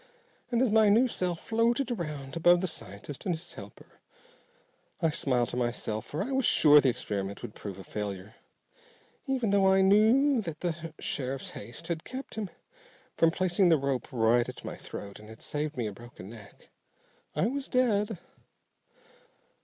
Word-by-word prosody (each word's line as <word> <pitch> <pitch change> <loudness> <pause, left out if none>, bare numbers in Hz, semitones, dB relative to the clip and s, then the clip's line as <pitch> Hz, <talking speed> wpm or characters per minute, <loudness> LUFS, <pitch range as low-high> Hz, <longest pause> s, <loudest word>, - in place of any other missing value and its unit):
And 240 0 +2
as 245 - +2
my 220 -1 +5
new 230 +5 +5
self 180 -7 -1
floated 235 +3 +1
around 150 - -4
above 175 +1 +5
the - - 0
scientist 115 - -8
and 175 - +1
his 160 - -10
helper - - -13 1.0
I 165 -3 +2
smiled 125 -5 +1
to - - -4
myself, 120 -2 -2
for 150 - -2
I 255 - -5
was 265 0 +1
sure 150 -8 +7
the 135 - +3
experiment 100 -4 -3
would 105 - -6
prove 100 -3 -7
a 95 - -9
failure, 100 0 -5 0.9
even 255 -6 0
though 200 -1 +4
I 190 0 +5
now 190 - +4
knew 235 +6 +5
that 165 -6 -6
the 165 -2 -4
sheriff's 135 -1 -3
haste 120 +10 -8
had 165 -2 -3
kept 260 +1 -7
him 210 -3 -4 0.7
from 165 - +4
placing 180 +1 +2
the 165 - +5
rope 140 -2 -2
right 120 0 +3
at - - -9
my - - -5
throat 100 0 -9
and 105 0 -13
had 110 - -11
saved 150 0 -3
me 120 - -1
a 105 - -3
broken 105 -2 -11
neck. 110 -4 -14 0.7
I - - +2
was 275 +4 -2
dead. 220 -5 +1
165 Hz, 175 wpm, -29 LUFS, -, 1.0 s, sure